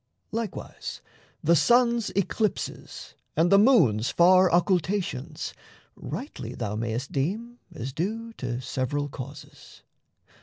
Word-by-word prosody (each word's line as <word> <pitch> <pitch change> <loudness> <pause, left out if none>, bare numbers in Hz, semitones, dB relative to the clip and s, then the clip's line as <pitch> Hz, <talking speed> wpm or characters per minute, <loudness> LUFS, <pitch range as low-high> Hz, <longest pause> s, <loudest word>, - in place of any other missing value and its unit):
Likewise, 225 -2 -5 0.4
the 170 +3 +5
sun's 235 - +3
eclipses 200 +2 -2 0.2
and 170 +2 +3
the 200 - +7
moon's 155 - +4
Far 185 +1 +5
occultations 175 -4 0 0.4
rightly - - -6
thou 105 0 -3
mayst 115 +4 -3
deem 220 - -2 0.2
As 130 -1 -5
due 225 +8 -3
to 120 -1 -3
several 135 +3 -2
causes. 140 +2 -10
170 Hz, 105 wpm, -26 LUFS, 135-210 Hz, 0.4 s, the